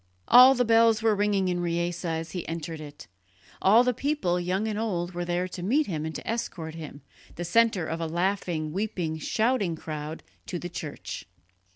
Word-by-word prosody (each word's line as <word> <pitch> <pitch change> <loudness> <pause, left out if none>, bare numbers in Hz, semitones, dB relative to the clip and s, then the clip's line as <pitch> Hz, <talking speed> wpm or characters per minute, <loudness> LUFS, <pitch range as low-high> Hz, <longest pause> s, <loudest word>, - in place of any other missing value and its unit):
All 255 +2 +9
the 245 0 +2
bells 225 -1 +4
were 225 -1 +4
ringing 200 -2 +1
in 180 -1 0
Riese 170 0 -2
as 165 -1 -3
he 180 - -5
entered 165 -1 -5
it; 145 -1 -10 0.6
all 220 +5 +6
the 250 0 +1
people, 255 -10 0
young 185 +4 -1
and 215 -1 -2
old, 180 -6 -2
were 175 -1 -4
there 175 +1 -1
to 180 - -7
meet 265 +12 +2
him 160 - -3
and 160 - -6
to - - -7
escort 175 -8 -3
him, 155 -3 -9 0.3
the 175 - -4
centre 220 -2 +3
of 165 +1 -4
a 165 - -1
laughing, 170 -2 -1
weeping, 180 -6 -2
shouting 215 - 0
crowd, 155 0 -6 0.2
to 180 - -3
the 175 +1 -6
church. 140 - -7
175 Hz, 190 wpm, -27 LUFS, 165-220 Hz, 0.6 s, All